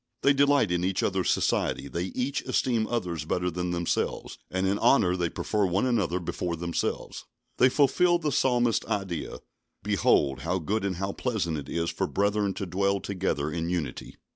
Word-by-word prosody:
They 140 - +6
delight 140 -7 +3
in 90 0 0
each 95 0 0
other's 95 -1 0
society; - - 0
they 85 +5 -3
each 125 +8 -2
esteem 115 -4 +1
others 90 -10 -2
better 90 +3 -1
than 90 +1 -3
themselves, 85 -1 -2
and 95 +1 -1
in 100 +2 +1
honour 90 -10 +4
they 85 -2 0
prefer 105 +4 -1
one 95 +6 +1
another 105 -8 +1
before 85 0 -3
themselves. 85 +1 -3 0.3
They 130 - +6
fulfil 175 +6 +3
the 155 -3 -2
Psalmist's 120 -4 +2
ideal: 95 -6 -3 0.4
"Behold, 65 -1 +2
how 85 +7 -1
good 100 +5 -1
and 95 -2 -1
how 95 +3 -2
pleasant 95 - -2
it 70 - -9
is 85 0 -1
for - - -2
brethren 100 0 0
to 100 - -3
dwell 100 +2 0
together 95 -7 -2
in 85 0 -2
unity." 80 -8 -4
95 Hz, 175 wpm, -27 LUFS, 85-110 Hz, 0.4 s, They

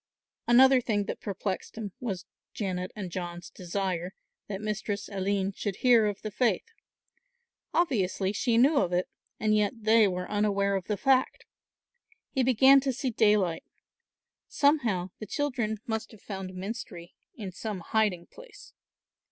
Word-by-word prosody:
Another 260 +2 +6
thing 210 -3 0
that - - -6
perplexed 195 +1 -4
him 210 -3 -5
was 195 -8 -4 0.3
Janet 185 -3 -3
and 190 -4 -6
John's 175 0 -6
desire 185 0 -3 0.3
that 195 -2 -4
Mistress 210 -1 -3
Aline 195 0 -1
should 200 0 -4
hear 235 -2 +4
of 205 -1 -4
the 215 - -4
faith. 240 - +1 1.1
Obviously, 200 - +1
she 230 +2 +1
knew 280 +5 +5
of 180 -8 +1
it 180 +1 +1 0.3
and 215 0 +2
yet 210 -1 +2
they 220 0 +5
were 180 -1 -3
unaware 200 -1 +1
of 190 -2 -2
the 210 - -1
fact. 265 +1 +2 0.9
He 265 - 0
began 260 +2 +6
to 270 0 -1
see 255 +1 -2
daylight; 210 -6 +2 0.8
somehow 235 - +1
the 215 - -7
children 240 -6 -1
must 220 -1 -3
have 210 - -15
found 190 -2 -6
Menstrie 185 -3 -7 0.2
in 200 -5 -6
some 200 0 -5
hiding 195 -3 0
place. 485 - -15
210 Hz, 145 wpm, -28 LUFS, 190-235 Hz, 1.1 s, Another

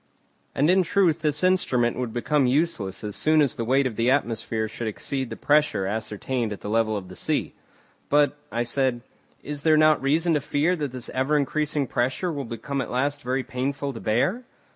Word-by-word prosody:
And 145 - +3
in 190 +1 +4
truth 180 -2 +2
this 150 0 -1
instrument 130 -11 +2
would 125 -2 -3
become 135 +4 +1
useless 125 - 0
as 105 -1 -4
soon 155 0 +3
as 145 -4 +3
the 115 - -4
weight 135 +4 +2
of 120 -4 -3
the 115 +2 +2
atmosphere 115 -4 0
should 115 +1 -5
exceed 130 +4 -3
the - - -5
pressure 145 -9 +2
ascertained 110 +3 -2
at 105 - -6
the 105 - -5
level 110 -1 +1
of 95 -2 -7
the 90 - -11
sea. - - -2 0.6
"But," 145 -1 +3 0.2
I 120 - 0
said, 120 0 0 0.4
"is 145 0 -5
there 155 +1 +4
not 155 0 +5
reason 160 +5 +2
to 150 - +1
fear 150 +5 +1
that 145 -5 -3
this 125 -1 -6
ever 135 +4 +1
increasing 150 0 0
pressure 130 +9 -1
will 140 -2 -4
become 135 +4 -4
at - - -5
last 145 +3 -1
very 130 +1 -1
painful 135 +2 -3
to 115 - -7
bear?" 125 - +1
135 Hz, 200 wpm, -25 LUFS, 115-150 Hz, 0.6 s, not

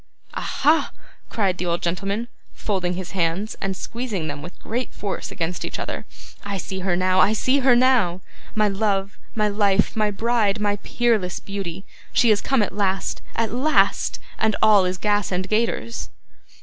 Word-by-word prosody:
'Aha!' 310 +2 +2 0.4
cried 195 -5 0
the 180 - -2
old 170 0 +1
gentleman, 195 +6 -1 0.3
folding 180 -4 -1
his 180 -1 -6
hands, 185 +3 -1
and 190 -1 -2
squeezing 230 -8 -4
them 145 -1 -5
with 175 +4 -10
great 245 +3 -3
force 200 -2 -4
against 170 +1 -3
each - - -4
other. - - -5 0.4
'I 200 -1 -3
see 190 +2 -5
her 185 -1 0
now; 185 +1 +2
I 210 - +5
see 260 +5 +2
her 260 -2 +5
now! 240 -8 +3 0.3
My 215 -1 +3
love, 195 -1 -1 0.2
my 215 -1 +2
life, 205 -1 +2
my 215 -1 +2
bride, 215 -1 +1
my 205 -1 +1
peerless 215 -5 0
beauty. 195 -2 -6 0.3
She 235 -2 +5
is 205 - +3
come 265 -5 +2
at 190 - -3
last 195 -2 -1
at 225 -1 0
last 285 +6 +2 0.2
and 220 -1 +2
all 210 -3 +6
is 180 0 -1
gas 205 0 +1
and 185 +1 -1
gaiters! 230 +2 -1
200 Hz, 170 wpm, -23 LUFS, 185-220 Hz, 0.4 s, all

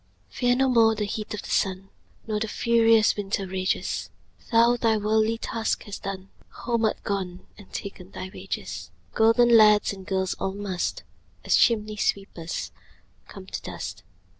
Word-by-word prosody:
Fear 245 0 +2
no 265 +1 +2
more 225 -3 +4
the 210 -1 -2
heat 210 +1 -5
o' - - -7
the - - -7
sun, 190 0 0 0.4
Nor 215 -1 -1
the 220 - -2
furious 230 -1 +4
winter's 195 -1 -2
rages; 185 0 -1 0.4
Thou 235 +1 +5
thy 225 -2 +2
worldly 220 +2 +1
task 225 0 -2
hast 205 -2 -8
done, 195 -1 -6 0.3
Home 235 -2 +1
art 215 - -1
gone, 185 -3 -3
and 205 -2 -16
ta'en 190 -2 -7
thy 185 -1 -7
wages: 95 - -6 0.2
Golden 230 +2 +5
lads 210 -2 +6
and 190 -1 -10
girls 190 -1 0
all 190 0 -2
must, 200 -3 -3 0.4
As - - +4
chimney 215 -2 +2
sweepers, 185 -5 -2 0.6
come - - -11
to - - -6
dust. 100 +3 -7
210 Hz, 160 wpm, -25 LUFS, 190-225 Hz, 0.6 s, lads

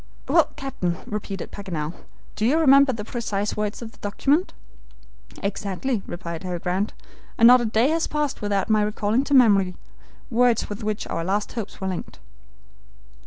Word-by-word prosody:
"Well, - - +4
captain," 180 -11 -3
repeated 205 -2 -5
Paganel, 170 -6 -4 0.4
"do 210 - -3
you 260 +8 +3
remember 280 -3 +6
the 215 -4 -5
precise 210 -4 -2
words 210 +2 -3
of 225 - -8
the - - -22
document?" 280 - +1 0.9
"Exactly," 200 +4 -2
replied 170 -2 -6
Harry 180 -1 -3
Grant; 185 +4 -1 0.4
"and 230 - +5
not 250 0 +8
a - - -1
day 225 +4 +2
has 325 +1 +1
passed 300 -2 -2
without 205 -2 0
my 215 -1 +3
recalling 210 +3 +1
to 285 - +2
memory 200 -7 +5 0.6
words 240 -1 +3
with 205 +2 -6
which 215 0 -2
our 165 - -3
last 200 +4 -1
hopes 225 -4 -6
were 190 - -3
linked." 185 -2 -5
210 Hz, 165 wpm, -24 LUFS, 195-245 Hz, 0.9 s, not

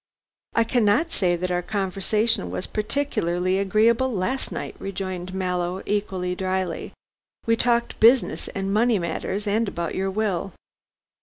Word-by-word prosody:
"I 230 - +5
cannot 240 +7 +2
say 180 -3 +1
that 180 +1 -2
our 180 0 +1
conversation 195 - 0
was 90 +1 -3
particularly 190 -6 -1
agreeable 225 +6 +3
last 235 +6 -2
night," - - -5
rejoined 185 -2 -4
Mallow, 180 0 -2
equally 190 -3 -1
dryly, 185 -1 -2 0.5
"we 230 - +3
talked 235 0 +1
business 235 +3 +4
and 195 0 -3
money 230 +1 +3
matters, 190 +4 -3
and 215 +2 +1
about 170 -4 -3
your 190 +1 -1
will." 195 -3 -1
195 Hz, 135 wpm, -24 LUFS, 180-225 Hz, 0.5 s, I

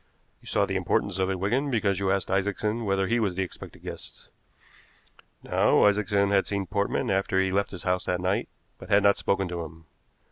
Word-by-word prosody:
You - - -17
saw - - +2
the - - -2
importance - - 0
of 95 0 +1
it, 95 - -1
Wigan, 125 +9 0
because 105 -6 +1
you 100 -1 0
asked 100 -1 -1
Isaacson 105 +4 -1
whether 95 -1 +1
he 115 +4 +1
was 100 -5 0
the 95 - 0
expected 90 - -10
guest. - - -10 1.1
Now, - - +3
Isaacson 100 -1 +2
had 100 -1 +2
seen 100 -1 -2
Portman 100 +5 -1
after 95 0 0
he 95 0 +2
had - - -4
left 100 0 +1
his 90 - -8
house 90 0 0
that 90 0 -1
night, 95 +2 -1 0.3
but - - -11
had 100 0 +4
not 100 0 +4
spoken 95 -1 0
to 85 -1 -4
him. 80 +1 -12
100 Hz, 210 wpm, -26 LUFS, 95-100 Hz, 1.1 s, had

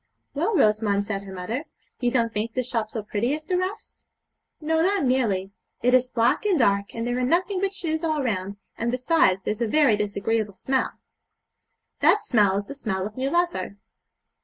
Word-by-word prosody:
'Well, 345 +10 0
Rosamond,' 210 - +2
said 200 -2 -3
her 195 -1 -10
mother, 220 - -4 0.3
'you 245 - +1
don't 235 -2 0
think 220 +2 -3
this 255 -2 -1
shop 230 -4 -1
so 220 -1 -5
pretty 220 +6 -1
as 310 0 -9
the 365 - -1
rest?' 370 +3 -4 0.6
'No, 320 +1 +1
not 390 0 +2
nearly; 220 -8 +1 0.3
it 250 +1 +3
is 255 0 +4
black 235 - +2
and 405 -4 +2
dark, 200 -5 +1
and 230 0 -3
there 245 +1 -1
are - - 0
nothing 365 +8 +1
but 390 -1 +1
shoes 320 -4 -3
all 310 -3 0
round, 200 -4 -2 0.2
and, 230 - 0
besides, 250 - +2
there's 210 +2 -3
a 235 - +2
very 275 -2 +4
disagreeable 210 +1 -1
smell.' 265 +6 -1 1.1
'That 420 - +4
smell 205 -5 +3
is 200 - -3
the 280 - -7
smell 205 -9 -3
of 210 +1 -7
new 265 +1 -1
leather.' 345 - -1
240 Hz, 190 wpm, -25 LUFS, 210-305 Hz, 1.1 s, is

